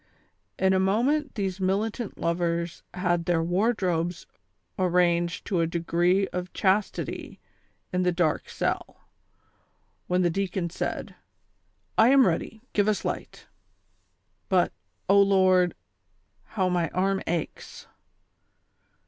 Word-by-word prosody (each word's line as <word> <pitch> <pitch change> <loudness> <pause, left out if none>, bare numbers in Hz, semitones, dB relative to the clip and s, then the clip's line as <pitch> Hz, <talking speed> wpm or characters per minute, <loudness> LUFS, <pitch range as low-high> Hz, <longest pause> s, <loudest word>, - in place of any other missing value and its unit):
In 190 0 +3
a 190 - +3
moment 245 +11 +1
these 195 -3 -2
militant 205 +4 -1
lovers 170 0 -1
had 175 -2 0
their 170 -2 +1
wardrobes 175 -2 0 0.5
arranged 175 -2 +1
to 185 - 0
a 165 - +1
degree 175 +3 +1
of 180 0 -5
chastity 195 +1 -1 0.5
in 180 - +1
the 180 0 +2
dark 170 -3 0
cell, - - -3 1.1
when 180 0 +2
the 175 - +2
deacon 185 -2 -2
said: - - -4 0.4
" - - -44
I 220 - +7
am 270 -1 +6
ready, 200 +5 -2
give 205 0 +2
us 210 -4 0
light; - - -5 1.0
but, 185 -2 +2 0.3
O 200 +1 +6
Lord, 185 -3 +4 0.7
how 190 -4 -1
my 175 -3 0
arm 195 +1 0
aches." 165 -2 -4
185 Hz, 115 wpm, -26 LUFS, 175-195 Hz, 1.1 s, I